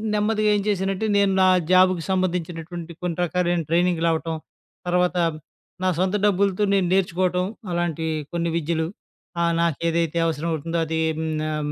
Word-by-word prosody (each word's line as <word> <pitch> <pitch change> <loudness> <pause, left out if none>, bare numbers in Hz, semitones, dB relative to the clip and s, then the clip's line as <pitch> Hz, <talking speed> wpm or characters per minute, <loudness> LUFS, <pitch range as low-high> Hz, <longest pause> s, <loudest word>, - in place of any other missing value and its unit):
నెమ్మదిగా 215 0 +1
ఏం 205 - +1
చేశానంటే, 195 0 0
నేను 200 -1 +3
నా 185 - +6 0.2
జాబ్‌కి 185 -2 +4
సంబంధించినటువంటి 175 -2 -3
కొన్ని 175 -2 -2
రకాలైన 175 0 0
ట్రైనింగులవ్వటం. 165 -1 +1 0.5
తర్వాత 180 0 +1 0.7
నా - - +2
సొంత 190 +2 +1
డబ్బులతో 200 0 +2
నేను 195 -2 +2
నేర్చుకోవటం 180 -1 +1 0.3
అలాంటియి 165 -2 -1 0.2
కొన్ని 170 0 0
విద్యలు. 160 0 -1 0.5
ఆహ్, 170 0 +2
నాకేదైతే 170 0 0
అవసరం 165 0 -1
అవుతుందో 165 +2 -3
అది 160 0 -1 0.2
హ్మ్. 160 0 -2 0.2
ఆహ్, 150 -1 -2
175 Hz, 135 wpm, -23 LUFS, 165-185 Hz, 0.7 s, నా